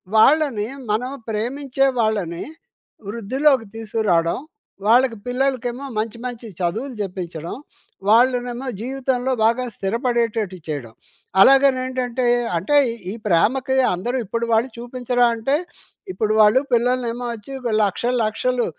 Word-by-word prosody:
వాళ్ళని 260 -2 +4 0.2
మనం 245 +5 -1 0.2
ప్రేమించే 260 +5 -1
వాళ్ళని 200 -7 0 0.7
వృద్ధిలోకి 255 +4 +1
తీసుకురావడం. 210 -7 0 0.5
వాళ్ళకి 240 0 +4
పిల్లలకేమో 255 0 -1
మంచి 225 +1 -3
మంచి 240 -2 -6
చదువులు 225 +10 -2
చెప్పించడం, 175 -4 -5 0.5
వాళ్ళనేమో 245 +2 +2
జీవితంలో 260 0 -1
బాగా 235 +3 +2
స్థిరపడేటట్టు 230 -2 -1
చేయడం. 140 -7 -5 0.5
అలాగనేంటంటే 255 -1 +3 0.3
అంటే 195 - 0 0.2
ఈ - - -4 0.2
ఈ - - -5
ప్రేమకి 250 +9 +2 0.2
అందరూ 240 +9 -2
ఇప్పుడు 230 +4 -2
వాళ్ళు 225 +4 +2
చూపించరా 245 0 0
అంటే, 230 +5 0 0.6
ఇప్పుడు 215 -7 0
వాళ్ళు 215 +5 +6
పిల్లలనేమో 245 0 +1
వచ్చి 225 +3 -10
ఒక 235 -3 -2
లక్షలు, 240 +5 -1
లక్షలు 245 +3 0
235 Hz, 110 wpm, -21 LUFS, 215-255 Hz, 0.7 s, వాళ్ళు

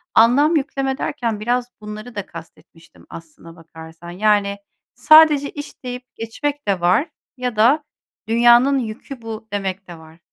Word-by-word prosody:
anlam 280 +8 +4
yükleme 270 -2 -2
derken, 230 -7 -3
biraz 245 +3 -2
bunları 215 +3 -9
da 205 -2 -4
kast 165 -1 -12
etmiştim 165 0 -21
aslına 165 +1 -13
bakarsan. 165 +1 -13
Yani, 200 +1 +1 0.4
sadece 300 +2 +6
"İş" 290 -2 -10
deyip 250 0 -8
geçmek 285 +4 -5
de 190 -3 0
var 185 - +2 0.3
ya 250 -2 -3
da 260 +8 +3 0.4
"dünyanın 240 +4 +4
yükü 235 +2 -7
bu." 220 -1 -8
demek 195 -1 -4
de 170 -2 -10
var. 160 +1 -17
225 Hz, 145 wpm, -20 LUFS, 190-260 Hz, 0.4 s, sadece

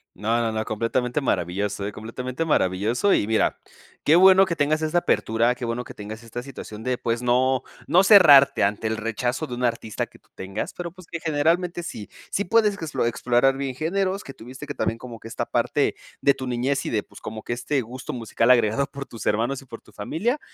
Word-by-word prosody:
No, 115 +3 0
no, 115 -1 0
no, 110 0 -2
completamente 120 +5 -1
maravilloso, 100 - -1
eh, 105 - -4
completamente 125 +7 -5
maravilloso 115 - +2
y - - +1
mira, 110 -1 +1 0.4
qué 155 - +5
bueno 190 +1 +7
que 170 - -2
tengas 155 +1 +1
esa 155 +3 +1
apertura, 115 -6 +1
qué 125 - -7
bueno 120 +1 -3
que - - -11
tengas 110 +2 -8
esta 120 +1 -6
situación 120 -5 -9
de, 125 +1 -1
pues, 115 +1 -2
no 130 +1 +2 0.2
no 180 - +5
cerrarte 145 -9 +7
ante 105 +2 0
el 110 - -1
rechazo 120 +6 -2
de 125 - -6
un 125 - -5
artista 115 -3 -1
que - - -20
tú - - -34
tengas, 95 +2 -5
pero 175 -1 -5
pues, 185 0 -15
que 170 - -6
generalmente 170 +3 0
sí 105 -10 -7 0.2
sí 200 - -1
puedes 215 0 +3
explo 160 -9 -2
explorar 125 +2 +2
bien 135 -2 -3
géneros, 190 +6 -1
que 135 - -9
tuviste 125 +3 -10
que - - -5
también 115 - -1
como 120 -2 -9
que 115 - -9
esta - - -3
parte - - 0 0.3
de 140 - +4
tu 130 -1 -6
niñez 125 +3 -1
y - - -2
de 105 -2 0
pues, - - -15
como 110 0 -7
que - - -4
este 135 +4 -1
gusto 125 +3 -7
musical 115 0 0
agregado 120 +2 +4
por 140 -1 -8
tus 115 -6 -9
hermanos 120 +6 0
y - - -17
por 115 -2 -10
tu 110 - -20
familia, 200 - -2
125 Hz, 215 wpm, -24 LUFS, 115-155 Hz, 0.4 s, bueno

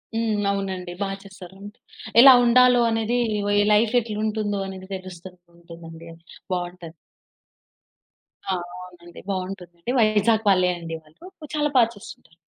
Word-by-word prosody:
హ్మ్. 220 -2 -1
అవునండి. 190 -2 -4
బాగా 195 -1 -3
చేస్తారు 190 -2 -13
అండి. 205 +3 -11 0.4
ఎలా 265 +1 +10
ఉండాలో 250 0 +5
అనేది, 225 +2 -1 0.6
లైఫ్ 215 +2 +2
ఎట్లా 215 -2 -6
ఉంటుందో 210 -2 -2
అనేది 190 -1 -9
తెలుస్తూ 185 -1 -10 0.3
ఉంటుంది 170 -1 -13
అండి, 165 0 -12 0.4
బాగుంటది. 175 -2 -6 1.5
ఆ! 190 - 0 0.3
అవునండి. 175 -1 -14
బాగుంటుంది 185 -2 -5
అండి. 235 - -4
వైజాగ్ 215 0 +2
వాళ్ళే 185 -2 +3
అండి 165 -1 -7
వాళ్ళు. 155 - -19 0.3
చాలా 295 0 0
బాగా 230 -2 +5
చేస్తుంటారు. 180 -4 -14
195 Hz, 130 wpm, -23 LUFS, 180-220 Hz, 1.5 s, ఎలా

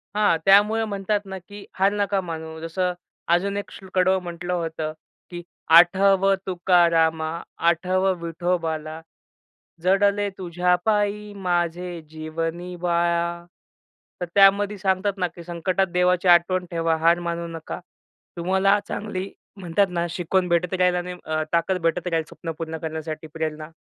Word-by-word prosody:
हां, 210 -6 +3
त्यामुळं 210 +3 +5
म्हणतात 200 +1 -1
ना, 190 -1 -6
की 205 +3 -12
हार 195 +1 +4
नका 200 -1 0
मानू. 160 -2 -7
जसं 180 +2 -1 0.4
अजून 200 +3 +1
एक 205 - -5
श्लोक 190 -1 -4 0.2
म्हटलं 175 0 -4
होतं, 160 -2 -3 0.4
की 175 -1 -7 0.4
"आठव 195 +2 +4
तुकारामा 170 -3 +3 0.4
आठवं 185 +2 +1
विठोबाला 165 -2 -2 0.8
जडले 200 +2 +3
तुझ्या 180 0 +1
पायी 210 -1 0
माझे 175 -2 -2
जीवनी 165 +3 -5
बाळा." 170 0 0 0.8
तर - - 0
त्यामध्ये 200 +1 +5
सांगतात 190 +1 0
ना, 180 -1 0
की 170 0 -12
संकटात 180 +3 -1
देवाची 180 0 +2
आठवण 180 +1 +4
ठेवा. 165 -1 +1
हार 165 +2 +3
मानू 170 0 -3
नका. 160 - -7 0.6
तुम्हाला 190 +3 +2
चांगली 200 -2 -4 0.3
म्हणतात 190 +1 +1
ना, 175 -1 -1
शिकवण 180 +2 0
भेटत 170 +1 +1
राहील 180 0 +3
आणि 180 0 -3
अ 155 0 -1
ताकद 180 +2 +1
भेटत 165 +2 0
राहील 165 -2 0
स्वप्न 165 - -7
पूर्ण 160 -1 -5
करण्यासाठी 160 0 -5
प्रेरणा. 155 -1 -4
180 Hz, 135 wpm, -23 LUFS, 165-190 Hz, 0.8 s, त्यामुळं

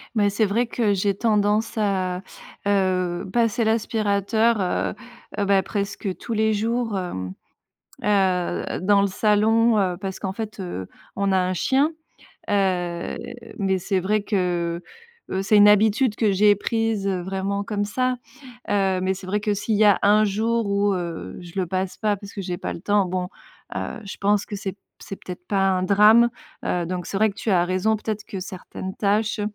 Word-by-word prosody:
Mais 205 -2 +3
c'est 210 +2 +1
vrai 230 +4 +1
que 225 -3 +1
j'ai 200 0 +1
tendance 210 0 +1
à, 185 -3 0 0.5
heu, 185 -2 +1
passer 235 0 +2
l'aspirateur, 220 0 +1
heu 180 - -1 0.5
heu, 200 - +1
bah, 195 -1 +3
presque 200 -1 -3
tous 235 - -5
les 220 0 +2
jours, 225 +1 -1
hem, 95 - -4 0.7
heu, 190 -4 +1
dans 200 +2 +4
le - - +3
salon, 215 +3 +3
heu, 185 -3 +1
parce 190 0 -5
qu'en 190 -2 -3
fait, 215 +1 -6
heu, 175 - -5 0.3
on 200 0 0
a 190 - +4
un 185 0 0
chien, 275 - +2 0.6
heu, 180 -4 0 0.4
mais 190 -2 +1
c'est 195 +1 -1
vrai 210 +3 +1
que, 175 -4 -1
heu 470 - -14
heu 190 - 0
c'est 210 +2 +3
une 205 0 +8
habitude 215 +3 +4
que 220 -3 +2
j'ai 205 +2 +5
prise 225 -1 -1
vraiment 195 +2 -2
comme 205 -1 -2
ça, 255 +4 0 0.5
heu, 195 -2 +2
mais 190 +1 +1
c'est 190 0 -10
vrai 205 +3 0
que 210 -1 0
s'il 205 +2 -1
y 215 - +4
a 205 -3 +6
un 210 +1 +5
jour 225 +3 0
où, 200 0 +2
heu, 170 - -5
je 175 -1 -11
le 185 - 0
passe 185 +1 -2
pas, 215 -2 +1
parce 200 0 -11
que 200 - -5
j'ai 180 -1 -4
pas - - -4
le - - -8
temps, 205 +1 +2
bon, 180 0 -2 0.5
heu, - - -4
je 200 - -7
pense 205 0 +1
que - - -6
c'est 195 -1 -4
p 200 - -22 0.2
c'est 200 -1 -7
peut-être 180 -1 -9
pas 195 -1 +2
un 185 -1 +1
drame, 210 +5 +6 0.3
heu, 175 -2 -1
donc 180 -1 -4
c'est - - -4
vrai 215 +2 +4
que 200 - -6
tu 220 - -3
as 175 -3 +4
raison. 185 +5 +1
Peut-être 215 0 -4
que 195 - -6
certaines 190 0 -7
tâches, 210 +1 0
200 Hz, 190 wpm, -23 LUFS, 185-215 Hz, 0.7 s, une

